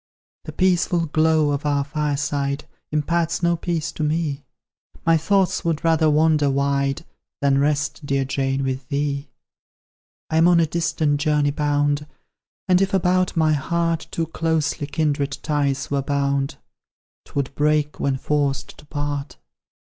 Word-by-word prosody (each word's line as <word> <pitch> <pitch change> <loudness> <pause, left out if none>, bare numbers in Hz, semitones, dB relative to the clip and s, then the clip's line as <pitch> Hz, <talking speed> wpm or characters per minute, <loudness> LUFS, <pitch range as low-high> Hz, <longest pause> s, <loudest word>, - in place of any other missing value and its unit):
"The - - -6
peaceful 180 -2 +2
glow 155 -1 +2
of 140 0 -2
our 145 -1 +1
fireside 145 -1 -2 0.3
Imparts 170 +3 0
no 170 0 +3
peace 165 -2 -2
to - - -7
me: 150 -2 -1 0.6
My 165 - +5
thoughts 190 +4 +1
would 165 -1 -1
rather 160 -1 +3
wander 150 -1 +3
wide 140 +2 0 0.3
Than 140 -1 +2
rest, 150 +2 0
dear 140 -1 0
Jane, 135 0 -1
with 130 0 -3
thee. 140 0 -2 1.0
I'm 160 +2 +4
on 175 -1 +5
a 165 - +4
distant 155 -2 0
journey 150 -1 +2
bound, 145 0 0 0.6
And 180 0 +4
if, 195 0 +1
about 185 -1 +1
my 155 -1 +3
heart, 165 +2 -1
Too 165 - -2
closely 160 -2 -1
kindred 145 -2 -1
ties 140 -3 -1
were 140 -1 +1
bound, 140 +1 0 0.7
'Twould 140 -1 -3
break 150 0 +1
when 135 -1 0
forced 140 -1 -1
to - - -15
part. 145 - -4
150 Hz, 140 wpm, -22 LUFS, 140-165 Hz, 1.0 s, My